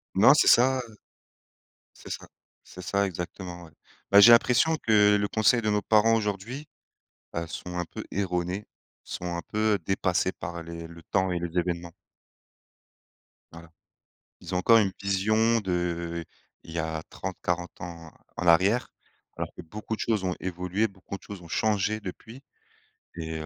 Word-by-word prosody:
Non, 110 +8 +8
c'est 150 - +4
ça, 130 +2 +6
heu 115 -4 -9 1.1
C'est - - -7
ça. - - -6 0.4
C'est 90 - -11
ça, 100 +1 +1
exactement, 90 0 -6
ouais. 80 - -16 0.4
Bah, 100 - +8
j'ai 115 +4 +10
l'impression 125 +7 +5
que 105 -2 +5
le 100 - 0
conseil 110 +3 +3
de 110 - +1
nos 105 0 +1
parents, 110 +2 +4
aujourd'hui, 110 +7 -3 0.7
heu, 85 0 -2
sont 90 +2 -7
un 90 - 0
peu - - -8
erronés, 90 0 -2 0.4
sont - - -6
un 85 - -3
peu, 110 +1 +1
dépassés 95 -1 +1
par 85 -2 -7
les 85 0 -8
le 85 0 -13
temps 95 +2 0
et 85 - -1
les 85 0 -4
événements. 85 -1 -3 1.6
Voilà. 85 0 -12 0.7
Ils 90 +1 -6
ont - - +2
encore 115 +5 +6
une 100 -3 +2
vision 110 +4 +2
d'il 85 -3 -2 0.4
y 80 +1 -6
a 80 -1 -2
30-40 90 -2 -4
ans 85 -2 -8 0.2
en 90 - -3
arrière 95 +8 +4 0.5
alors - - -4
que - - -8
beaucoup 105 +6 -6
de - - -8
choses 110 -4 0
ont 90 - 0
évolué, 90 +4 -1
beaucoup 95 0 -9
de - - -20
choses 100 -3 -9
ont - - -12
changé 110 +1 0
depuis 110 +6 -9 0.7
et 80 -1 -5
heu, 80 - -6
95 Hz, 165 wpm, -27 LUFS, 85-110 Hz, 1.6 s, j'ai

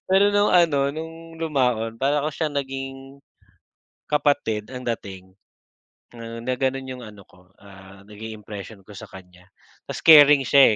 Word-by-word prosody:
Pero 195 +2 +5
nung 205 0 +3
ano, 145 -6 +3
nung 165 +1 -9
lumaon 125 -8 -1
para 140 +3 +1
ko 155 - -2
siya 155 +2 -2
naging, 135 0 -6 0.9
kapatid 140 -8 0
ang 125 0 -7
dating 95 -5 -6 0.9
na 115 +2 -5
gano'n 135 0 -2
yung 125 -1 -8
ano 105 -2 -13
ko, 90 +1 -23
ah, 95 -1 -15
naging 110 +1 -9
impression 105 0 -10
ko 100 - -16
sa - - -9
kanya. 90 -1 -15 0.4
Tapos - - -6
caring 150 -3 +8
siya, 135 -5 +6
130 Hz, 145 wpm, -23 LUFS, 105-145 Hz, 0.9 s, caring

